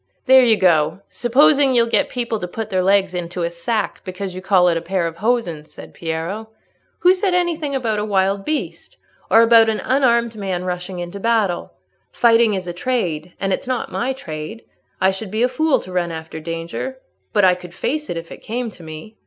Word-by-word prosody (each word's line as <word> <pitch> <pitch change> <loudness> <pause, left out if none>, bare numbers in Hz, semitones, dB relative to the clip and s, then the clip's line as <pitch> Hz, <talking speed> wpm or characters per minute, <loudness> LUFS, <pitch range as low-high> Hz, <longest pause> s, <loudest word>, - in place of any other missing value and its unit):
"There 260 0 +7
you 225 -3 +4
go, 170 -1 +2
supposing 270 +2 +3
you'll 235 -1 +5
get 230 - +1
people 235 -3 -2
to 180 - -4
put 220 +4 -6
their 185 -1 +2
legs 195 0 +2
into 175 0 -4
a 170 - -1
sack 200 +6 -2
because 185 0 -5
you 185 - -7
call 190 -2 +4
it 170 - +3
a 165 - -1
pair 180 +1 -1
of 165 0 -4
hosen," 215 -9 0
said - - -13
Piero. 170 +7 -4 0.5
"Who 360 +1 +6
said 375 -1 0
anything 330 -5 0
about 225 -5 -1
a - - -1
wild 195 -1 +1
beast, 195 - -4 0.3
or 225 - +6
about 230 -1 +6
an 220 - -1
unarmed 235 -4 +2
man 190 -4 -3
rushing 180 0 -4
on 175 - -8
battle? 200 -2 0 0.4
Fighting 230 -3 +4
is 185 -1 -4
a 175 - -5
trade, 175 -6 -2
and 195 -1 0
it's - - -4
not 255 -2 -2
my 250 +2 -1
trade. 215 - -7 0.4
I 190 - +4
should 190 +2 -6
be 215 +4 0
a - - +5
fool 295 +4 +1
to 185 - -10
run 175 -1 0
after 160 0 -7
danger, 165 +11 -5 0.3
but 205 - +4
I 185 - +6
could 180 -1 -10
face 300 +8 -2
it 170 - -3
if 165 0 -7
it - - -10
came 235 +1 -4
to 180 - -16
me." 160 +7 -10
200 Hz, 210 wpm, -20 LUFS, 175-235 Hz, 0.5 s, There